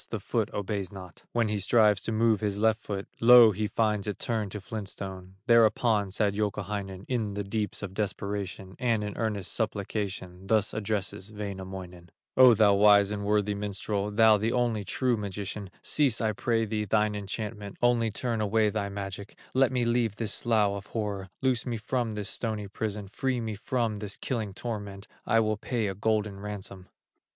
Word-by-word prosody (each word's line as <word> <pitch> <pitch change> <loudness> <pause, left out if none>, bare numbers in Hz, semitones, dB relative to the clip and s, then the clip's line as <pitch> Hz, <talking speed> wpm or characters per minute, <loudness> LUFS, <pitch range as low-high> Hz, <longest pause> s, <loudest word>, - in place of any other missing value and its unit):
the - - -3
foot - - -1
obeys 100 -2 -3
not; 95 -3 -10
When 115 -2 +1
he 105 -1 -1
strives 105 +1 +4
to - - -4
move 110 -1 +3
his 100 -2 -1
left 110 +1 +2
foot, 100 -1 -5
Lo! 120 -1 +9
he 105 +2 -2
finds 105 -1 0
it 105 - -3
turned 110 -4 -2
to 105 - -4
flint 105 -1 -5
stone. 95 -1 -8
Thereupon 115 -3 +4
sad 100 +1 +1
Youkahainen, 100 -2 -3
In 110 -5 -1
the 105 - -2
deeps 105 +1 -3
of 95 -2 -5
desperation, 100 -2 -4
And 115 -4 +1
in 105 -1 -4
earnest 105 -5 -2
supplication, 95 -4 -3
Thus 105 -1 +2
addresses 105 -1 -3
Wainamoinen: 95 -4 -7 0.3
"O 130 -2 +8
thou 105 -1 +5
wise 100 0 +6
and 105 -1 -3
worthy 105 0 +2
minstrel, 100 0 -2
Thou 110 0 +5
the 110 +3 0
only 120 -4 0
true 125 +3 0
magician, 100 0 -5
Cease 140 -7 +2
I 110 -1 +1
pray 115 +2 0
thee 105 0 -2
thine 105 +1 +2
enchantment, 105 0 -5
Only 120 -2 +3
turn 115 +1 -2
away 105 0 +2
thy 100 -2 -2
magic, 100 0 -7 0.2
Let 130 -1 +4
me 125 -2 +1
leave 115 -3 +1
this 115 0 0
slough 110 -4 +3
of 100 0 -5
horror, 100 -4 -3
Loose 130 -2 +1
me 120 -2 -1
from 115 0 -2
this 105 -1 -3
stony 110 -3 -2
prison, 105 0 -4
Free 130 +5 -1
me 110 -2 -3
from 115 0 -1
this 100 -1 -3
killing 110 -7 -3
torment, 100 -4 -5 0.2
I 115 -2 +4
will 110 -1 0
pay 115 +1 -2
a 100 - -1
golden 105 0 -1
ransom." 100 -2 -7
105 Hz, 180 wpm, -28 LUFS, 100-110 Hz, 0.3 s, Lo